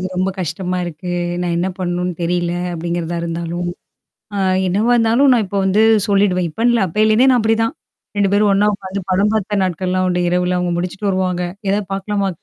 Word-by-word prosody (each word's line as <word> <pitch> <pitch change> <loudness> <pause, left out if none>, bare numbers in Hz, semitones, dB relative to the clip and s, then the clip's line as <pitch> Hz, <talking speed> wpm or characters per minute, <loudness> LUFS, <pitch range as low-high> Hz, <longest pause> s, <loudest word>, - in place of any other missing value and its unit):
இது 185 - -2
ரொம்ப 185 +1 +1
கஷ்டமா 185 +1 -3
இருக்கு. 175 +1 -6 0.3
நான் 175 -1 -1
என்ன 175 +2 0
பண்ணணுன்னு 180 0 -2
தெரியல, 175 0 0 0.2
அப்பிடிங்கிறதா 170 0 -3
இருந்தாலும். 170 +1 -3 0.7
அ - - -1 0.3
என்னவா 210 +7 +2
இருந்தாலும் 235 +4 +4
நான் 235 -3 +3
இப்ப 200 +1 -3
வந்து 195 +3 +3 0.3
சொல்லிடுவேன். 195 -3 +2
இப்பன்னு 230 +9 +1
இல்ல 235 -3 +2
அப்பேல 215 +5 +1
இருந்தே 250 +5 +4
நான் 250 - +4
அப்பிடிதான். 225 +1 +1 0.4
2 200 -1 +2
பேரும் 205 0 +3
ஒன்னா 205 +1 +3
உட்கார்ந்து 195 0 -6
படம் 200 +3 +2
பாத்த 205 -1 0
நாட்கள்லாம் 185 +1 -1
உண்டு. 180 0 0
இரவுல. 180 0 +1
அவுங்க 180 -1 -1
முடிச்சுட்டு 185 +3 -3
வருவாங்க. 185 -1 -1 0.3
எதா 205 - +1
பாக்கலாமா? 195 0 -1
185 Hz, 180 wpm, -18 LUFS, 175-210 Hz, 0.7 s, இருந்தாலும்